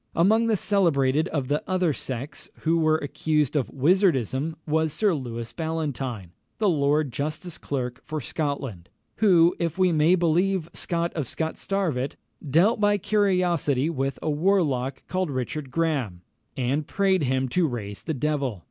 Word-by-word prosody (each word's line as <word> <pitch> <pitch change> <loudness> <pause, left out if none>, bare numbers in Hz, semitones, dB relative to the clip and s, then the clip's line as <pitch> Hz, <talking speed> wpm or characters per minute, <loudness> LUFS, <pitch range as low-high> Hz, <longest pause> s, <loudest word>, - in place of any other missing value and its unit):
Among 220 +7 +4
the 220 -2 +2
celebrated 160 -7 +2
of 140 -7 -2
the 145 +2 0
other 185 -4 +2
sex 130 +2 -6
who 165 +1 +2
were 155 -1 +3
accused 150 0 -1
of 130 -7 0
wizardism 150 - +1
was 160 0 +1
Sir 205 +4 +2
Lewis 120 -5 -5
Ballantyne, 140 - -3 0.3
the 215 - +1
Lord 150 -3 +2
Justice 155 +4 -4
Clerk 125 -3 -4
for 155 0 -4
Scotland, 135 - -4 0.3
who, 175 -5 +5
if 170 0 -2
we 185 -1 +3
may 160 +3 +4
believe 175 +1 +1
Scot 170 -1 -2
of 150 -6 -3
Scotstarvet, 160 -3 -2 0.3
"dealt 170 - +3
by 205 0 +4
curiosity 175 -8 +1
with 135 -3 -2
a 160 - 0
warlock 150 -6 +1
called 185 -2 -1
Richard 135 +2 -3
Grahame," 135 - -1 0.4
and 135 +4 -1
prayed 195 -2 +2
him 130 0 0
to 175 +5 +2
raise 105 -6 -5
the 160 - -3
devil. 135 -6 -1
155 Hz, 150 wpm, -25 LUFS, 135-175 Hz, 0.4 s, who